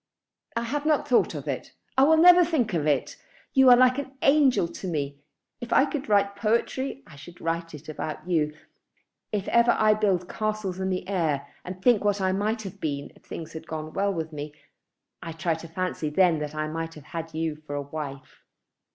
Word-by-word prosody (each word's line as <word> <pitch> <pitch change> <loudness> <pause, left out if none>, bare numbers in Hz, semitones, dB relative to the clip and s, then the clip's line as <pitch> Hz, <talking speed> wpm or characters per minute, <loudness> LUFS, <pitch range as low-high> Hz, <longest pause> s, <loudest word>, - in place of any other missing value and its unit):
"I 230 - 0
have 285 +5 -2
not 305 -2 +2
thought 245 - +3
of - - -6
it. - - -4 0.2
I 265 - +6
will 320 +2 +5
never 355 +2 +8
think 285 - 0
of 155 -3 0
it. 145 -3 0 0.4
You 265 -2 +6
are 245 - +9
like 255 +1 +4
an 270 -1 -6
angel 275 - +4
to 185 - -7
me. 140 -4 -3 0.4
If 240 - -8
I 265 - +5
could 280 -4 -5
write 200 -1 +3
poetry, 235 +6 -1
I 155 - -15
should 170 +5 -13
write 165 -2 -4
about 155 +2 -5
you. 155 -4 +1 0.8
If 205 -2 -2
ever 235 0 +4
I 215 0 +5
build 195 -4 +1
castles 215 -4 -3
in 190 0 -1
the 185 -1 -3
air 160 -8 0 0.2
and 180 +1 -7
think 240 -5 +4
what 205 -1 +1
I 190 -1 +1
might 215 +3 -1
have 195 0 -8
been 140 -2 -3
if - - -21
things 160 - -7
had 160 0 -8
gone 155 -1 -5
well 200 0 +1
with 160 -3 -4
me, 150 0 -6 0.7
I 165 - -6
try 165 +1 -1
to 160 +1 -7
fancy 165 -2 -3
then 170 0 +3
that 150 0 -5
I 155 0 -2
might 165 +1 -5
have 150 - -12
had 165 -1 -5
you 160 -1 -2
for 145 - -4
a 145 - -2
wife. 140 -2 -8
185 Hz, 205 wpm, -26 LUFS, 155-230 Hz, 0.8 s, are